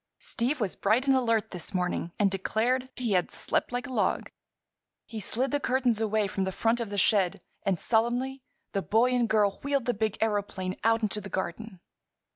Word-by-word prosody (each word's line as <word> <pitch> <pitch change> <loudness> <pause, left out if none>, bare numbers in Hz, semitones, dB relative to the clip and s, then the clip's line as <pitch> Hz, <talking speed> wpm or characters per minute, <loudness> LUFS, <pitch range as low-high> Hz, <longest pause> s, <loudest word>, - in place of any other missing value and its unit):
Steve 255 +6 -2
was 205 -5 -1
bright 220 +6 +2
and 270 -1 +4
alert 230 -4 +1
this 180 +2 -6
morning 180 -1 -1
and 200 -2 +3
declared 240 +7 0
he 240 -4 -2
had 180 -2 +2
"slept - - -1
like 245 0 -2
a 260 - -7
log." - - 0 0.7
He 225 - -6
slid 245 +6 -1
the 290 - +1
curtains 250 -4 +1
away 215 -1 +1
from 195 0 -2
the 190 - -1
front 230 +5 +1
of 230 -3 -3
the 205 - -4
shed 195 -1 +3 0.3
and 190 -4 +2
solemnly 245 +4 +1 0.3
the 195 - -1
boy 230 +6 +3
and 245 -2 +2
girl 205 -3 +2
wheeled 280 -3 0
the 245 - +1
big 215 -1 -1
aëroplane 200 -3 -1
out 225 +1 +3
into 210 0 -1
the 195 - -8
garden. 190 +1 -4
220 Hz, 195 wpm, -28 LUFS, 195-245 Hz, 0.7 s, and